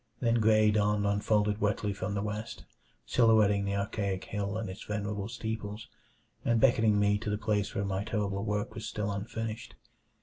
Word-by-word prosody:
Then 120 -1 +2
gray 110 -1 +5
dawn 105 -1 +2
unfolded 105 +1 +1
wetly 105 0 0
from 100 +1 -3
the 100 - -1
east, 105 +1 -5 0.4
silhouetting 105 -4 +4
the 100 0 -1
archaic 100 -1 -2
hill 100 0 -3
and 110 -1 -3
its 95 +3 -7
venerable 105 -1 -3
steeples, 110 -2 -5 0.5
and 115 -1 +2
beckoning 110 -5 +4
me 105 0 +3
to 105 - -4
the 105 - 0
place 105 -2 -1
where 100 - 0
my 95 0 -1
terrible 100 -2 -2
work 105 -1 -2
was 110 - -6
still 105 -1 -2
unfinished. 110 +2 -5
105 Hz, 170 wpm, -30 LUFS, 100-110 Hz, 0.5 s, gray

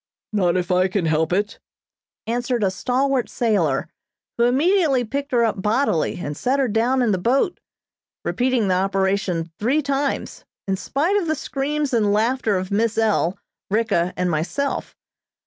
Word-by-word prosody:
"Not 185 -4 +2
if 180 0 -2
I 180 +1 +3
can 190 -2 -1
help 160 +1 +1
it," 205 +3 -1 0.7
answered 240 0 -1
a 190 - +2
stalwart 260 +5 0
sailor, 170 - +1 0.5
who 235 - +2
immediately 285 +1 +3
picked 280 +5 -4
her 235 -2 +3
up 215 -3 -1
bodily 210 - +1
and 150 -3 -4
set 255 - 0
her 270 -2 +2
down 240 +4 +1
in 230 - +2
the 190 - 0
boat, 270 - +1 0.7
repeating 250 -4 +1
the 185 - +2
operation 190 -3 0
three 270 +8 +1
times, 280 0 -2 0.2
in 195 - +1
spite 300 - 0
of 370 -5 -1
the 315 - +1
screams 290 -1 -2
and 215 -3 +2
laughter 220 0 +1
of 185 +1 -4
Miss 220 +2 +1
L., 210 -5 +1 0.3
Ricka 200 -5 +1
and 180 -1 0
myself. 175 - -2
225 Hz, 160 wpm, -22 LUFS, 190-265 Hz, 0.7 s, I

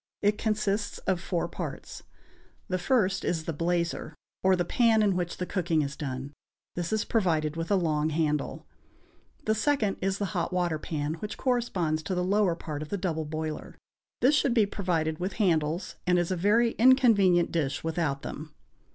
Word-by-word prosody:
It 210 +1 +2
consists 210 -2 -1
of 185 -2 0
four 175 -3 -1
parts. - - -6 0.7
The 185 0 0
first 195 -2 +1
is 165 -2 -1
the 165 - -3
blazer, 170 +2 -1 0.3
or 190 0 +4
the 175 -1 0
pan 225 +1 +3
in 200 -3 +2
which 175 -1 -2
the 180 - -2
cooking 170 -5 0
is 140 0 -4
done; 135 -1 -5 0.4
this 175 +1 -3
is 220 -1 0
provided 160 -8 +1
with 165 0 -4
a 205 - +4
long 155 -4 +1
handle. 150 -2 -1 0.8
The 215 - +3
second 220 -3 +1
is 195 +1 0
the 205 - -1
hot 175 -1 -1
water 175 -4 0
pan, 150 -1 -3
which 210 +3 -5
corresponds 195 - 0
to 185 +4 -3
the 180 - 0
lower 195 -2 +2
part 150 -3 -6
of 155 - -6
the 200 - -2
double 165 -4 -2
boiler; 155 0 -5 0.4
this 265 +4 +5
should 275 -4 +2
be 220 -3 +5
provided 165 -6 -1
with 185 +2 -2
handles, 170 -4 0
and 180 0 +4
is 175 +1 0
a - - +1
very 215 +6 +3
inconvenient 220 -9 +5
dish 145 -5 -1
without 160 -4 -1
them. 155 0 -7
180 Hz, 180 wpm, -28 LUFS, 160-205 Hz, 0.8 s, this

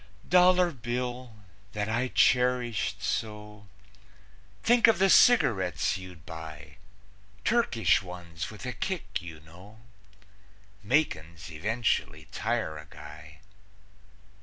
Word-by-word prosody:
Dollar 180 0 +5
Bill, 125 -1 -5 0.4
that 105 0 -2
I 120 +3 0
cherished 120 -6 +1
so, 105 -1 -4 1.0
Think 240 0 +5
of 225 - +4
the 195 -1 +4
cigarettes 110 - +4
you'd 90 -4 -12
buy, 80 -1 -10 0.7
Turkish 220 - +2
ones, 90 -2 -7
with 110 +4 -10
a 125 - -3
kick, 190 - -4
you 80 -3 -10
know; 90 +7 -16 1.0
Makin's 85 - -1
eventually 85 -3 -1
tire 110 -10 -2
a 75 - -12
guy. 75 0 -13
105 Hz, 100 wpm, -28 LUFS, 80-125 Hz, 1.0 s, Dollar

